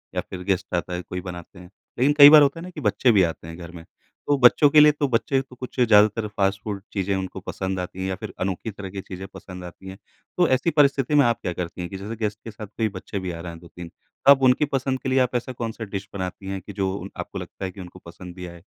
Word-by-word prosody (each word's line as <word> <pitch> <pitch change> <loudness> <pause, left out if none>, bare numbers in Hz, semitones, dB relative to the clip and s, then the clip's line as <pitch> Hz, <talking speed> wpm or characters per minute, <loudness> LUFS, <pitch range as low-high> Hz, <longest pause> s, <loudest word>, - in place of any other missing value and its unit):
या - - 0
फिर 90 -1 -7
गेस्ट 95 -1 -2
आता 90 +1 -2
है 90 - -3
कोई 90 0 -6
बनाते 90 0 -9
हैं। 90 0 -13 0.3
लेकिन 140 +3 +4
कई 145 0 +11
बार 155 0 +9
होता 145 +3 +2
है 180 - -9
कि 155 - -8
बच्चे 120 +3 +3
भी 100 -4 +5
आते 80 0 -3
हैं 85 +1 -8
घर 85 -1 -9
में, 85 -1 -11
तो 145 +10 -5
बच्चों 135 +3 +6
के 150 - +6
लिए 150 0 +8
तो 145 -1 -1
बच्चे 130 +2 +1
तो 130 -1 -15
कुछ 125 +1 -8
ज़्यादातर 110 -2 +4
फास्ट 100 +1 +1
फूड 100 -3 -4
चीज़ें 100 -1 -1
उनको 95 0 -4
पसंद 95 0 -4
आती 90 +1 -6
हैं 95 - -2
या 95 - -2
फिर 105 +2 -8
अनोखी 95 +3 -3
तरह 100 -1 -8
की 95 +1 -6
चीज़ें 95 0 -8
पसंद 90 -1 -10
आती 90 +2 -11
हैं। 95 - -9 0.4
तो 175 - +4
ऐसी 130 +6 +2
परिस्थिति 140 -1 +3
में 145 -2 +6
आप 120 -1 +1
क्या 90 - -3
करती 90 +1 -5
हैं 90 - -5
कि 95 - -6
जैसे 105 +4 -6
गेस्ट 105 -2 -3
के 115 - -7
साथ 105 0 -9
कोई 110 +2 -2
बच्चे 95 0 -6
भी 90 -1 -4
आ 85 - -7
रहा 85 0 -6
हैं, 85 - -11
2-3 85 0 -11 0.4
अब 140 -1 +8
उनकी 130 +4 +4
पसंद 135 -2 -2
के 130 - -3
लिए 130 0 +3
आप 125 -1 +1
ऐसा 120 +2 -2
कौन-सा 115 -1 -5
डिश 100 -1 -6
बनाती 95 0 -5
हैं, 95 -1 -4
कि 100 +2 -10
जो 95 -1 -1
उन - - -7
आपको - - -6
लगता - - -7
है 95 - -4
कि 95 - -10
उनको 90 +1 -11
पसंद 90 +1 -11
भी 90 -1 -7
आए? 85 -1 -11
100 Hz, 280 wpm, -23 LUFS, 90-125 Hz, 0.4 s, कई